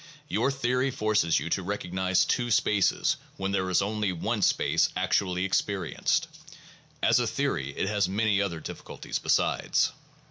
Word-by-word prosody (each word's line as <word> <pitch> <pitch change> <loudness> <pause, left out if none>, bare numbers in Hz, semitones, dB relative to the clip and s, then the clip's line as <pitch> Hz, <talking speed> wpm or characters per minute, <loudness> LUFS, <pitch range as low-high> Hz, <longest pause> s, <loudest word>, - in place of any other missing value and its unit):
Your 145 - +1
theory 130 -1 0
forces 105 -8 +1
you 85 - -5
to 95 - +1
recognize 95 -1 0
two 120 -1 0
spaces 105 -3 +2 0.2
when 95 0 -2
there 95 -1 0
is 90 - +2
only 105 -1 -1
one 85 - -2
space - - +2
actually 90 -1 0
experienced. 95 0 0 0.8
As - - +4
a - - 0
theory 70 +1 -2
it - - 0
has 100 -3 +1
many 100 0 +1
other 90 -5 -2
difficulties - - -6
besides. - - +1
100 Hz, 145 wpm, -27 LUFS, 90-105 Hz, 0.8 s, As